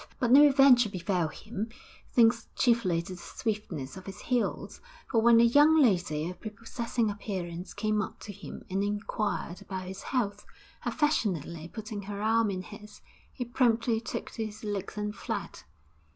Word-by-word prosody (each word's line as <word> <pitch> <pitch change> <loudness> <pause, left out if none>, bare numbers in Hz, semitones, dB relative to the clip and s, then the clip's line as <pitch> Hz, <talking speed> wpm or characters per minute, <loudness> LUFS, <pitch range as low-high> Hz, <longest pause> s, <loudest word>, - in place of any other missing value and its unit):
But 245 -2 +1
no 290 +3 +9
adventure 265 -4 +6
befell 180 -2 -1
him, 215 +6 -6 0.5
thanks 230 -1 +4
chiefly 210 -9 +2
to 185 - -7
the 175 - -10
swiftness 190 - -4
of 190 0 -10
his 195 - -7
heels, 245 -2 -2 0.3
for 230 -3 +3
when 235 0 +6
a - - +7
young 295 +7 +6
lady 175 - +2
of 180 - -8
prepossessing 230 +1 -2
appearance 185 -4 -5
came 215 -1 +1
up - - -6
to 205 - -7
him - - -9
and 195 +2 -1
inquired 205 -2 -2
after 200 -1 -7
his 190 +1 -7
health, 205 -6 -2 0.4
affectionately 175 - 0
putting 215 -2 -6
her 200 0 -6
arm 220 +1 +2
in 185 -1 -3
his, 210 +1 -12 0.3
he 250 - -5
promptly 230 -2 +2
took 230 - -5
to 225 - -3
his 215 +1 -11
legs 205 -1 -4
and 210 0 -3
fled. 210 -6 -5
210 Hz, 165 wpm, -29 LUFS, 190-235 Hz, 0.5 s, no